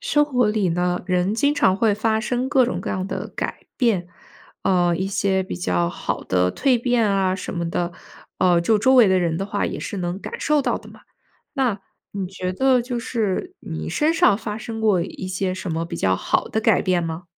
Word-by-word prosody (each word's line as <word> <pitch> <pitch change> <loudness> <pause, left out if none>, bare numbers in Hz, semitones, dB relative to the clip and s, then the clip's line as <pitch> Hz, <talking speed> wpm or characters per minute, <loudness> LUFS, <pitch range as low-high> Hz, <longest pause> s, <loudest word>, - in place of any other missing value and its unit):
生 300 -12 +2
活 250 -5 +1
里 210 -3 +1
呢， 180 +1 0
人 185 +2 +1
经 285 +5 +2
常 190 -9 +3
会 215 0 +2
发 220 +1 +1
生 245 +3 -1
各 265 -2 +4
种 245 - -2
各 - - -4
样 185 0 -2
的 - - -4
改 - - -5
变， 210 -9 +1 0.5
呃， 175 -2 +2
一 190 +3 -1
些 195 -1 +1
比 185 - -6
较 85 -1 0
好 - - -4
的 90 0 +1
蜕 255 -4 +2
变 245 -2 +2
啊 190 -1 +1
什 190 - -5
么 170 -1 -2
的， 175 +1 -2 0.5
呃， 175 -2 +4
就 210 +5 +2
周 260 +5 +4
围 240 -5 +7
的 190 0 +3
人 170 -3 0
的 195 - -2
话， 205 0 -1
也 - - -4
是 - - -5
能 175 +1 -3
感 - - -7
受 300 -1 +2
到 - - 0
的 - - -15
嘛。 - - -15 0.5
那 250 -8 0 0.3
你 195 -2 -3
觉 185 0 -4
得 260 +5 +3
就 245 0 -3
是， 230 - -2
你 160 -1 -6
身 300 - +1
上 210 - +4
发 210 -2 -5
生 225 0 -6
过 205 -5 +3
一 185 - -6
些 185 0 -2
什 185 -1 -5
么 165 +1 -1
比 170 0 -6
较 95 - +2
好 - - 0
的 220 - -1
改 220 -3 +3
变 180 -2 +1
吗？ 165 +1 -5
195 Hz, 240 characters per minute, -22 LUFS, 180-235 Hz, 0.5 s, 围